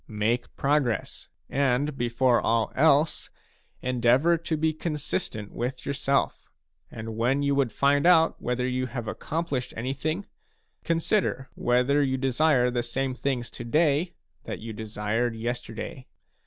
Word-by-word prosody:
Make 115 +3 -1
progress, 140 -5 0 0.2
and, 140 +1 +1
before 120 0 +2
all 115 -1 +1
else, 155 +1 +3 0.5
endeavour 125 +6 +3
to 165 -1 -2
be 160 +1 +1
consistent 150 - -3
with 125 +2 -4
your 140 - -1
self. 140 0 0 0.4
And 110 -1 -7
when 125 +5 +1
you 140 0 +2
would 135 -4 +1
find 140 +6 +3
out 165 -2 +4
whether 125 +1 -1
you 130 0 -1
have 120 -2 -5
accomplished 145 +1 -3
anything, 145 - -2 0.6
consider 165 -5 0
whether 125 +4 +2
you 130 -2 +1
desire 130 -1 +2
the 120 0 0
same 130 +2 -2
things 125 -2 -2
to - - -8
day 155 +6 +1 0.3
that - - -4
you 115 0 -7
desired 110 +2 -2
yesterday. 120 +2 -5
130 Hz, 135 wpm, -26 LUFS, 120-145 Hz, 0.6 s, out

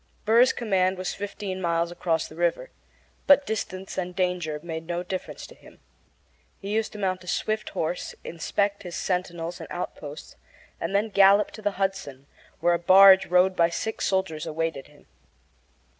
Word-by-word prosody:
Burr's 235 +4 +5
command 190 -5 0
was 185 0 -3
fifteen 200 -2 -5
miles 170 -1 0
across 165 -2 -1
the - - -14
river, 175 - -1 0.6
but 285 0 +6
distance 190 -3 -4
and 180 -1 -4
danger 180 -5 -1
made 160 -1 -6
no 175 0 -2
difference 185 0 -6
to - - -13
him. - - -18 0.8
He 200 +1 -5
used 220 0 0
to - - -8
mount 185 -2 -2
a - - -15
swift 215 +3 -2
horse, 165 +3 -3
inspect 200 +4 -2
his 175 -3 -7
sentinels 175 -1 -3
and 165 - -8
outposts, 150 -4 -7 0.4
and 195 - -3
then 210 +2 +1
gallop 200 0 +5
to 215 - -11
the 205 -1 -1
Hudson, 190 -9 -3 0.4
where 175 +1 +3
a 170 - 0
barge 190 +2 +7
rowed 180 +1 +3
by 170 -1 +3
six 220 +6 -3
soldiers 190 -5 -1
awaited 160 -3 -3
him. 145 -1 -21
185 Hz, 165 wpm, -25 LUFS, 170-200 Hz, 0.8 s, barge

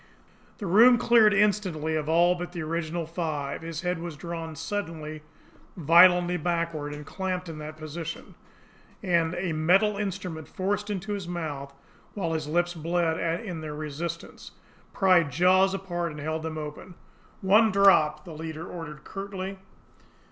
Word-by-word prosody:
The 205 - -6
room 230 +7 +7
cleared 235 -3 +5
instantly 190 -6 +1
of 155 -1 -2
all 170 +2 +4
but 175 0 -6
the 170 -3 -4
original 165 +1 -2
five. 155 -4 -3
His 165 -1 -5
head 180 -1 -1
was 170 -3 -6
drawn 165 -1 -6
suddenly, 160 -3 -5 0.6
violently 175 +2 +6
backward, 165 -3 -2
and 150 0 -8
clamped 185 +1 -3
in 160 -2 -7
that 155 +1 -8
position; 160 +1 -7 0.7
and 170 -2 +1
a 175 -2 -2
metal 190 +7 +3
instrument, 185 -6 -4
forced 205 +2 -2
into 205 +1 -3
his 195 -3 -5
mouth, 145 -5 -5 0.4
while 170 -5 -2
his 155 -2 -2
lips 175 +3 +1
bled 165 0 0 0.3
in 175 -5 -5
their 150 -1 -6
resistance, 155 +3 -6 0.4
pried 185 -5 +4
jaws 185 +2 +4
apart 175 -3 -3
and 150 - -8
held 155 +2 -3
them 160 0 -5
open. 155 +4 -7 0.5
"One 215 +3 +5
drop!" 160 -6 +4
the 170 - -9
leader 160 +1 -6
ordered 150 -3 -8
curtly. 195 -1 -6
170 Hz, 150 wpm, -27 LUFS, 155-185 Hz, 0.7 s, room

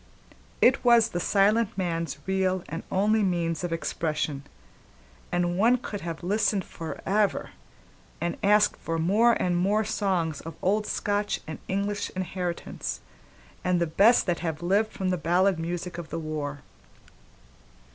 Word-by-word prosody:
It 250 - +5
was 235 -2 +5
the 175 - -3
silent 205 +3 +2
man's 165 -5 -2
real 190 -1 0
and 165 +3 -5
only 215 +3 +3
means 170 -4 0
of 175 - -2
expression, 155 -3 -2 0.9
and 175 0 0
one 235 +4 +5
could 210 -4 -6
have 165 -1 -6
listened 205 0 +1
forever, 195 +5 -1 0.7
and 170 0 -1
have - - -29
asked 210 +1 +4
for 165 0 -3
more 210 +9 +4
and 180 -5 0
more 200 +5 +2
songs 190 -8 -1
of 165 -1 -8
old 210 +3 +1
Scotch 205 0 -1
and 160 - -7
English 200 +1 -1
inheritance 180 -1 -4 0.6
and 180 -1 +2
the 170 - +2
best 200 +9 +4
that 175 -3 0
have 160 -2 -4
lived 205 +5 +2
from 190 -2 -2
the 180 - 0
ballad 180 +3 +2
music 175 +1 -4
of 165 - -8
the - - -4
war. 150 -3 -4
185 Hz, 145 wpm, -27 LUFS, 165-205 Hz, 0.9 s, It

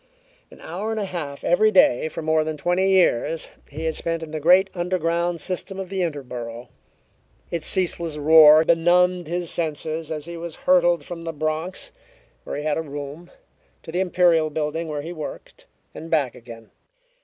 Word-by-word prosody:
An - - -16
hour 195 +6 -5
and 220 -1 -2
a 205 - -2
half 155 -7 -6
every 215 +5 +4
day 160 - +4
for 160 - -6
more 160 0 +2
than 155 0 -4
twenty 180 +5 +1
years 165 -4 +2 0.2
he 150 +3 -7
had 160 - 0
spent 165 0 -3
in 155 - -8
the 155 - -3
great 180 +5 +5
underground 175 -1 -1
system 190 +1 -4
of 190 -2 -5
the 190 -1 -2
Interborough. 125 -7 -5 0.8
Its 170 -2 -3
ceaseless 170 -4 0
roar 155 +1 +7
benumbed 175 +1 +3
his 175 0 -2
senses 160 -1 -3
as 150 -2 -4
he 170 0 -7
was 170 -1 -6
hurtled 175 -12 +3
from 175 -1 -7
the 165 0 -4
Bronx, 155 +3 -3 0.5
where - - -5
he 145 - -4
had 155 0 0
a - - -1
room, 145 +2 -8 0.5
to - - -9
the 175 - -1
Imperial 175 -4 +3
Building, 155 +2 -3
where 150 -2 -4
he 170 +3 -6
worked, 155 -3 -9 0.3
and 165 - -9
back 145 -7 +1
again. 115 -2 -13
165 Hz, 180 wpm, -23 LUFS, 150-175 Hz, 0.8 s, roar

